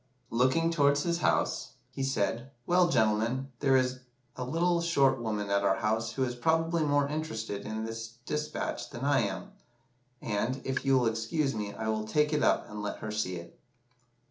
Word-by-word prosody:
Looking 130 +8 +3
towards 145 -2 +3
his 170 0 0
house, - - 0 0.2
he - - -6
said 120 -2 -1 0.2
'Well, 180 0 +4
gentlemen, 115 +2 +1
there 135 -2 +4
is 130 0 0 0.4
a 125 - -4
little 170 +6 +1
short 135 -7 +3
woman 105 -3 -2
at 100 0 +3
our 95 -1 +3
house 110 +3 -1
who 135 - 0
is 125 -1 -1
probably 165 +6 +1
more 145 -1 +2
interested 110 -10 -4
in 110 +1 -3
this 115 0 -6
despatch 150 0 -3
than 130 0 -5
I 145 0 +4
am; 115 - -3 0.7
and, 115 +5 -1
if 130 0 -1
you 135 -1 +4
will 125 - +2
excuse 115 +6 0
me, 105 -2 -4
I 110 - -4
will 110 0 -1
take 150 +6 +2
it 150 - +2
up - - +2
and 105 0 -6
let 105 - -3
her 110 - -5
see 105 -4 -1
it. 85 0 -10
130 Hz, 185 wpm, -30 LUFS, 110-150 Hz, 0.7 s, Well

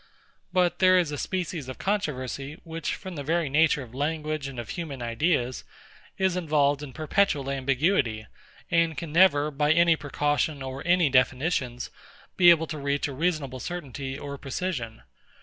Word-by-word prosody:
But 180 -2 +2
there 185 0 +6
is 170 -4 +1
a 145 - -3
species 170 -7 -3
of 130 - -7
controversy, 145 - -3
which, 165 -1 -4
from 190 -2 -8
the 145 - -5
very 165 +1 0
nature 150 0 +3
of 120 -1 -14
language 155 +1 -2
and 135 -2 -8
of 120 - -6
human 155 -6 -5
ideas, 120 +1 0 0.5
is 190 -1 +1
involved 150 -5 +1
in 145 -2 -7
perpetual 155 -2 0
ambiguity, 135 - +1 0.5
and 165 -2 +2
can 160 0 -5
never, 155 -3 +4
by 150 +1 +1
any 170 0 +5
precaution 145 -1 -1
or 130 +1 -6
any 175 -4 +4
definitions, 130 -1 +1 0.4
be 175 -1 +7
able 165 -1 +5
to 155 -1 -6
reach 140 +1 -1
a 140 - -6
reasonable 145 -4 -1
certainty 135 -5 -5
or 140 -1 -7
precision. 135 -6 -4
150 Hz, 160 wpm, -26 LUFS, 135-170 Hz, 0.5 s, be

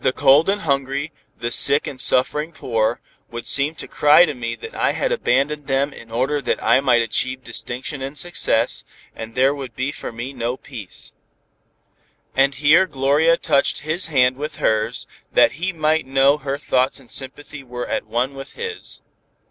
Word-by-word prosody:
The - - +3
cold 145 +5 +4
and 205 +1 0
hungry, 140 +1 -1 0.3
the 120 0 -4
sick 140 +3 +4
and 130 -2 -6
suffering 150 +7 +2
poor, 115 -6 -1 0.3
would 120 0 -7
seem 145 +3 +1
to - - -7
cry 150 +4 +5
to 150 - -3
me 115 -3 -4
that 115 - -10
I - - 0
had - - -1
abandoned 140 +3 0
them 140 +1 0
in 115 - -13
order 130 +6 -1
that - - 0
I 115 +3 +5
might 125 -3 +3
achieve 130 +3 -2
distinction 125 +4 -5
and 135 +2 -5
success, 125 -9 0 0.3
and 115 +1 -8
there 135 +2 +3
would 135 -5 -8
be 130 +2 -2
for - - -7
me 120 +4 -6
no 120 0 -3
peace." 115 -10 -9 1.2
And 135 +1 +3
here 160 +6 +5
Gloria 150 +3 +2
touched 140 -4 +1
his 160 +4 -2
hand 130 -4 +3
with 150 +2 -5
hers, 110 -1 0 0.3
that - - +5
he 190 +1 0
might 155 -3 0
know 135 +2 +3
her 140 -1 -3
thoughts 130 0 0
and 130 - -15
sympathy 145 +2 -6
were 125 -1 -6
at - - -3
one 125 +4 -1
with 135 0 -10
his. 460 -2 -7
135 Hz, 180 wpm, -21 LUFS, 125-150 Hz, 1.2 s, cry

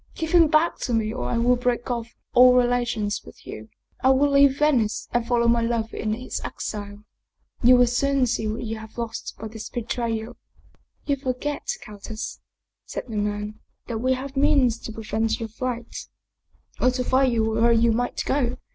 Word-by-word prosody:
Give 320 -1 -3
him 340 -2 +6
back 310 +2 +2
to 240 - -1
me 220 -1 0
or 120 0 -3
I - - 0
will 245 +2 +4
break 245 0 -1
off 235 -1 -4 0.2
all 250 0 +7
relations 240 -4 +1
with - - -15
you - - -9 0.3
I 260 - +5
will 275 +2 +4
leave 280 -1 +5
Venice 255 -8 +1
and 240 -1 0
follow 235 -1 +2
my 235 0 +4
lover 230 -1 -1
in 215 -1 -1
his 250 +3 -5
exile. 205 -1 -6 0.6
You 250 +1 +7
will 245 0 +6
soon 270 +2 +1
see 220 -2 -1
what 215 +3 -3
you 225 -1 -4
have 220 +1 -12
lost 230 -1 -5
by 220 - -6
this 220 0 -8
betrayal" 230 -1 -3 0.3
" - - -38
You 280 -1 +1
forget, 270 +2 -3 0.2
countess," 215 0 -7 0.4
said - - -6
the 220 - -5
man, 210 +1 -3
" - - -47
that 230 -2 -3
we 255 +3 +2
have 265 +2 -6
means 270 -5 +3
to - - -7
prevent 220 0 -2
your 225 -1 -4
flight, 240 +1 -5 0.7
or 255 - +4
to 255 0 -1
find 260 +1 +3
you 225 -2 +1
wherever 225 +1 +3
you 230 0 +4
might 245 +2 -1
go. 255 -3 0
235 Hz, 190 wpm, -24 LUFS, 220-255 Hz, 0.7 s, all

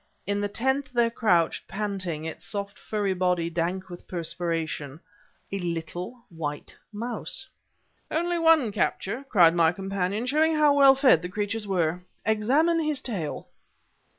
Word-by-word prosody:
In 205 0 -1
the 205 - -1
tenth 265 +5 0
there 235 -1 +3
crouched, 175 -8 +1
panting, 190 -6 -3
its 160 - -6
soft 200 0 -5
furry 205 -3 -1
body 180 -2 0
dank 175 +3 -2
with 175 -1 -11
perspiration, 165 -4 -3 0.5
a 195 - -2
little 175 +6 -5
white 150 -3 -5 0.2
mouse! 230 +3 -4 0.6
"Only 345 +2 0
one 325 -8 +4
capture!" 220 +5 -1
cried 170 -6 +6
my 165 -2 +4
companion, 195 +3 -2
"showing 310 +4 +2
how 300 -2 +5
well 275 -1 +7
fed 260 - +5
the 180 - -5
creatures 210 +2 -3
were. 175 -2 0 0.2
Examine 270 +11 +3
his 305 -3 0
tail!" 195 - -4
200 Hz, 140 wpm, -26 LUFS, 175-250 Hz, 0.6 s, well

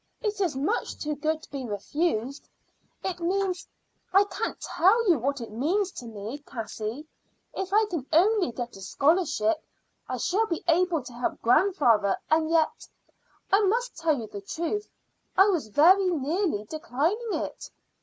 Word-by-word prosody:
It 420 -3 -2
is 345 -8 +1
much 305 - -1
too 300 0 -3
good 310 +2 -1
to - - -15
be 275 -2 -4
refused. 250 - -2 0.5
It 370 -2 -3
means 370 +1 -1 0.4
I 390 +2 +6
can't 405 - -4
tell 440 +6 +3
you 335 -7 +4
what 275 +2 -1
it 230 - -7
means 350 - 0
to 245 - -9
me, 220 +5 -6
Cassie. 230 0 -6 0.5
If 385 0 -4
I 430 +2 +4
can 335 -10 -4
only 370 - +4
get 240 +1 -6
a 195 - -11
scholarship 300 - +1 0.5
I - - -2
shall 440 +5 +1
be 335 -4 -3
able 340 -2 +2
to 245 - -10
help 240 +1 -3
grandfather. 235 - +3
And 315 0 +3
yet 325 -1 +1 0.6
I 395 +2 +5
must 475 +5 +1
tell 320 -4 +1
you 225 - -5
the 205 -1 -8
truth 340 - -3 0.5
I 390 +2 +7
was 335 - 0
very 365 - +5
nearly 320 - 0
declining 330 - -2
it." - - -4
320 Hz, 160 wpm, -27 LUFS, 250-380 Hz, 0.6 s, I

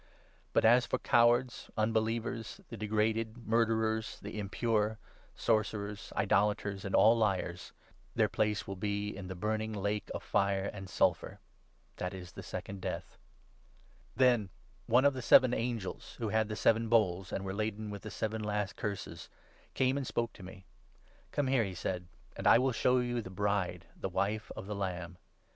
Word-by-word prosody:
But - - +3
as 120 +2 +6
for - - 0
cowards, 120 +1 +3
un 110 +1 +2
8 - - -3
believers, 115 +1 -1
the 115 - -6
degraded, 110 +2 -1
murderers, 110 -1 +1
the 105 +1 -6
impure, 105 +1 0 0.4
sorcerers, 105 -2 -1
idolaters, 105 -1 +1
and 100 - -1
all 115 +2 +7
liars 95 -5 -1 0.2
— - - -31
their - - +4
place 105 -2 0
will 95 - -5
be 100 +1 -2
in 95 -1 -7
the 95 - -5
burning 110 +3 -2
lake 105 +1 -2
of - - -5
fire 100 0 +1
and 95 -2 -8
sulphur. - - +1 0.6
That 90 +1 -3
is 90 -1 -9
the - - -9
Second 100 -1 -6
Death.' - - -5 1.0
Then 120 -6 +4 0.4
one 125 +4 +5
of 140 - +5
the 130 - -5
seven 125 +1 +6
angels 115 -5 -3
who 115 -2 -2
had 110 +1 +1
the 105 - -3
seven 115 +1 +2
bowls, 95 -5 +2
and - - -2
9 - - -7
were 95 - -3
laden 110 0 -3
with 100 -1 -6
the 110 - -7
seven 110 +1 -3
last 105 -2 -2
Curses, 100 -2 -5 0.5
came 130 +1 +2
and 135 -3 -3
spoke 120 0 -1
to - - -14
me. 95 +1 -11 0.3
' - - -31
Come 145 - 0
here,' 130 -3 +3
he 95 -3 -4
said, 90 +1 -3
' - - -29
and - - -2
I - - +8
will 130 +2 +2
show 125 +2 +3
you 120 -1 0
the 95 - -8
Bride, 100 0 -1
the - - -4
Wife 105 +2 -1
of - - -7
the 105 - -4
Lamb.' 90 -3 -4
105 Hz, 185 wpm, -32 LUFS, 100-115 Hz, 1.0 s, I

